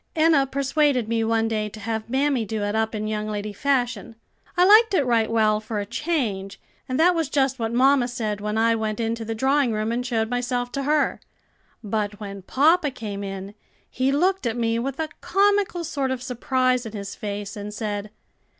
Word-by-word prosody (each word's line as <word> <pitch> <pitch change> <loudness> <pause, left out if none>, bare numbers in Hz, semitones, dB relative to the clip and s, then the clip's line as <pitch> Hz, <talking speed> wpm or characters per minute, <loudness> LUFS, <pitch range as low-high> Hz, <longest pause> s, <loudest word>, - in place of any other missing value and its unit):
"Enna 310 -4 +4
persuaded 275 -2 +1
me 225 0 0
one 225 0 +1
day 215 -1 -1
to 215 - -11
have 220 +1 -4
mammy 270 -1 +1
do 215 0 -3
it 205 0 -1
up 220 0 0
in 215 0 -3
young 215 0 -2
lady 210 0 -4
fashion. 245 -3 -1 0.4
I 355 - +6
liked 430 +1 +6
it 285 - +2
right 230 -3 +2
well 215 -2 +2
for 215 0 -5
a 205 - -3
change, 215 - -2 0.3
and 255 - -1
that 355 +3 +5
was 325 -4 -1
just 270 -2 +1
what 225 -1 -1
mamma 260 +1 +4
said 220 -4 -3
when 210 +1 -2
I 230 +1 +3
went 220 -1 -2
into 230 0 -2
the 225 0 -4
drawing 265 +2 +2
room 215 +1 -1
and 240 +1 -1
showed 230 -3 0
myself 245 0 -2
to 275 - -3
her. 305 0 +2 0.6
But 205 -1 -2
when 200 -2 -7
papa 300 - +3
came 205 -5 -6
in, 195 0 -6 0.4
he 260 +2 +1
looked 360 +1 +1
at 230 +1 -2
me 230 -1 0
with 270 +3 -4
a 315 -1 -1
comical 400 -3 +2
sort 280 -4 -2
of 260 -1 -3
surprise 255 -1 0
in 220 - -9
his 200 -2 -6
face, 205 0 -5
and 205 0 -6
said. 210 -1 -4
230 Hz, 200 wpm, -24 LUFS, 215-275 Hz, 0.6 s, I